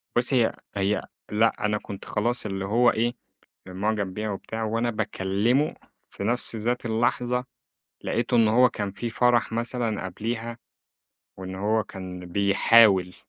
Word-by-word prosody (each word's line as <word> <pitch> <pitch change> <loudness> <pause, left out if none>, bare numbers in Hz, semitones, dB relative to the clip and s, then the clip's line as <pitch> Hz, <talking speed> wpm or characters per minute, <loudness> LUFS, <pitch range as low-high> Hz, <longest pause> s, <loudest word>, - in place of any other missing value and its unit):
بُصّي، 120 0 +4
هي - - -2 0.2
هي 100 +1 +1 0.3
لأ، 110 0 +2
أنا 105 0 +1
كنت 100 -1 -9
خلاص، 120 +2 0
اللي 95 -1 -3
هو 120 +4 +4
إيه، 120 +2 0 0.5
معجَب 100 0 -2
بيها 105 +1 -3
وبتاع 110 +3 -5
وأنا 115 +2 0
باكلّمه 110 +6 0 0.3
في - - -7
نفْس 120 +1 0
ذات 120 +2 -2
اللحظة، 120 +2 0 0.6
لقيته 120 +1 0
إنّه 110 -2 +4
هو 125 +2 +5
كان 105 -4 -4
في 120 +4 -4
فرَح 120 -1 +2
مثلًا 115 -3 -2
قبليها 115 +5 -4 0.8
وإن 95 0 -7
هو 105 +2 0
كان 95 -1 -8
بيحاول 100 0 +4
110 Hz, 140 wpm, -25 LUFS, 100-120 Hz, 0.8 s, هو